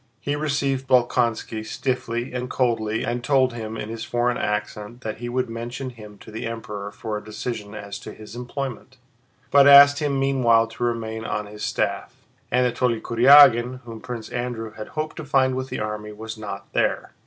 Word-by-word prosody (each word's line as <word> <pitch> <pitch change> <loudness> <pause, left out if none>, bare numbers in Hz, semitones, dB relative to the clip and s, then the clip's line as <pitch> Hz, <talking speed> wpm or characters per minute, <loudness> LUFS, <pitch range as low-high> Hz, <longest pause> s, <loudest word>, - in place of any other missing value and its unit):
He 145 +5 -2
received 140 -3 -1
Bolkónski 120 -3 +1
stiffly 120 0 -3
and 125 0 -3
coldly 115 -3 0
and 120 +1 -2
told 130 -1 +3
him 110 -1 -5
in 105 - -5
his 115 0 -5
foreign 120 +1 0
accent 105 +2 -3
that 110 -3 -5
he 120 +1 -5
would 125 +1 -1
mention 120 +3 -5
him 105 -3 -13
to - - -12
the 110 +2 -4
Emperor 105 -3 -6
for 105 +1 -5
a - - -16
decision 110 -1 -6
as 100 -1 -7
to - - -9
his 110 +1 -11
employment, 130 0 -6 0.5
but 140 0 +7
asked 140 0 +9
him 145 -3 0
meanwhile 125 -4 +3
to 115 +1 -7
remain 110 -2 -2
on 105 -1 -3
his 105 0 -11
staff. - - -2 0.4
Anatole 125 -1 +1
Kurágin, 125 0 +6
whom 115 -2 -10
Prince 115 -3 -6
Andrew 120 -2 -4
had 110 0 -8
hoped 155 0 -4
to 160 - -5
find 135 -2 +2
with 130 0 -4
the - - -4
army, 105 0 -4
was 110 +1 -7
not 100 -2 -8
there. - - 0
120 Hz, 180 wpm, -23 LUFS, 110-130 Hz, 0.5 s, asked